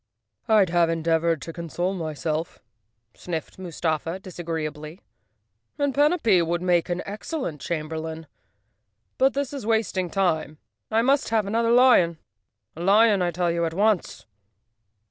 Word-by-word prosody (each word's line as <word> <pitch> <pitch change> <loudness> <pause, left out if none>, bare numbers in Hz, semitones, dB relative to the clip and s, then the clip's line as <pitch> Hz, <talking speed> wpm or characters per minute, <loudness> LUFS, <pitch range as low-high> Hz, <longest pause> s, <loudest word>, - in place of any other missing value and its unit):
" - - -39
Fd 210 -4 +5
have 170 -1 +3
endeavored 165 -1 0
to 165 - -7
console 175 +2 -3
myself," 160 -1 -3 0.6
sniffed 165 -4 -6
Mus¬ 175 -4 -8
tafa 165 +2 -1
disagreeably, 160 -3 -6 0.8
"and 285 -1 0
Panapee 285 - +3
would 170 +1 -2
make 175 -1 +2
an 175 +1 -2
ex¬ 205 +2 -6
cellent 260 - -4
chamberlain. 160 0 -4 0.9
But 270 +1 +3
this 280 0 -2
is 275 - -5
wasting 215 -5 0
time. 160 -6 -1 0.3
I 225 +1 +2
must 275 +3 +2
have 220 -2 +1
another 230 +3 0
lion. 235 -9 +5 0.6
A 165 - -8
lion, 205 +2 +4
I 175 - +1
tell 175 0 0
you, 170 0 -1
at 165 0 -2
once!" 205 -1 0
175 Hz, 145 wpm, -24 LUFS, 165-220 Hz, 0.9 s, Fd